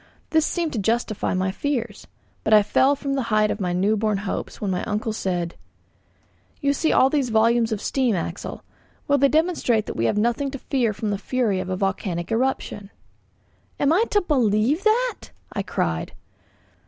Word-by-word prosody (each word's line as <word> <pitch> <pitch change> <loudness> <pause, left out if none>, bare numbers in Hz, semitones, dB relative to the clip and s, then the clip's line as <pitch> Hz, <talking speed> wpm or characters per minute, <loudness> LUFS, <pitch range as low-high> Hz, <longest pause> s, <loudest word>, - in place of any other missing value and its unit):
This 315 -1 +3
seemed 340 -3 -2
to 230 - -1
justify 220 -1 0
my 185 +1 0
fears: 240 +1 -3 0.4
But 220 - +5
I 210 - +6
fell 265 +7 +3
from 275 0 -3
the 275 - 0
height 215 -1 +3
of - - -3
my 180 -3 -1
new 195 +5 +2
born 215 -1 0
hopes 200 0 -4
when 200 -2 -2
my 180 - -1
uncle 215 +1 -2
said: 175 -5 -2 1.1
"You 280 -2 +1
see 315 +2 +1
all 265 - +4
these 280 -5 +1
volumes 230 +1 +3
of 215 - -1
steam, 250 -1 0
Axel; 170 +1 -5 0.4
well, 285 0 +3
they 280 +1 +5
demonstrate 305 -9 +1
that - - -6
we 115 - 0
have 205 - +1
nothing 240 +6 +1
to 275 - -6
fear 250 -4 0
from 210 +1 -3
the 200 - -2
fury 225 -4 0
of 185 0 -4
a 185 - -2
volcanic 190 -2 -2
eruption." 225 -4 -1 0.9
"Am 285 +2 +3
I 420 +7 +3
to 415 - +3
believe 255 - +1
that?" 480 +3 +1 0.3
I 200 - -1
cried. 80 - -2
225 Hz, 185 wpm, -23 LUFS, 200-275 Hz, 1.1 s, I